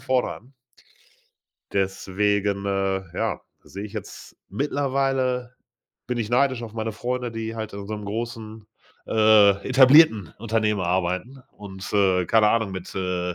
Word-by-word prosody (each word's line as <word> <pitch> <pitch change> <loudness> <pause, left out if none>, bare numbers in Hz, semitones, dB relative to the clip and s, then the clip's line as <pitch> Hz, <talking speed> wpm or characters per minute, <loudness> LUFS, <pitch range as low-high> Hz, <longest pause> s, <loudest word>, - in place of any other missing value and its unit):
vorne 130 -1 0
an.“ 130 +3 -14 1.2
Deswegen, 100 +1 0
äh, 95 -1 -1
ja, - - -1 0.2
sehe 100 +2 -8
ich 105 - -9
jetzt 105 -3 -9
mittlerweile, 130 -1 -1 0.5
bin 125 -1 -2
ich 110 -1 -3
neidisch 130 -1 +2
auf 110 - -8
meine 110 0 -3
Freunde, 125 +1 -3
die 115 0 -5
halt 110 -1 -5
in 100 0 -7
so 110 - -6
'nem 105 - -8
großen, 110 0 -6 0.4
äh, 110 -2 +6 0.2
etablierten 130 - +6
Unternehmen 110 -2 0
arbeiten 95 +9 -2
und, 95 -2 -9
äh, 95 -3 +3
keine 110 -1 +4
Ahnung, 110 -4 +1
mit, 95 -1 -7
äh, 90 -2 -2
110 Hz, 140 wpm, -24 LUFS, 100-120 Hz, 1.2 s, äh